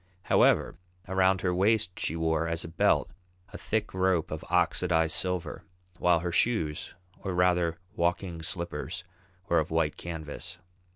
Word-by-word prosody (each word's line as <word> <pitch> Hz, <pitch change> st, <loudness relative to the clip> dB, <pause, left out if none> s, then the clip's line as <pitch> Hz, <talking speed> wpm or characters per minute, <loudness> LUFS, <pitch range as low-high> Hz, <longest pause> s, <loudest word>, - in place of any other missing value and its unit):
However, -, -, +3 dB, 0.3 s
around 95 Hz, 0 st, +3 dB
her 90 Hz, -1 st, +1 dB
waist 100 Hz, +1 st, +2 dB
she 80 Hz, -, -1 dB
wore 80 Hz, 0 st, 0 dB
as 85 Hz, 0 st, -1 dB
a -, -, -6 dB
belt 80 Hz, +1 st, +2 dB, 0.4 s
a -, -, -5 dB
thick 110 Hz, 0 st, -2 dB
rope 95 Hz, -3 st, +1 dB
of 80 Hz, -, -4 dB
oxidized 85 Hz, -2 st, +2 dB
silver, 90 Hz, 0 st, -2 dB, 0.4 s
while 85 Hz, -2 st, +3 dB
her 90 Hz, 0 st, -2 dB
shoes, 85 Hz, -6 st, 0 dB, 0.2 s
or 95 Hz, -2 st, -4 dB
rather 90 Hz, -2 st, +2 dB, 0.2 s
walking 85 Hz, -1 st, -1 dB
slippers, 85 Hz, +1 st, -4 dB, 0.4 s
were 85 Hz, -3 st, +3 dB
of 80 Hz, -, -2 dB
white 80 Hz, -2 st, 0 dB
canvas. 80 Hz, -3 st, -6 dB
85 Hz, 140 wpm, -29 LUFS, 80-90 Hz, 0.4 s, However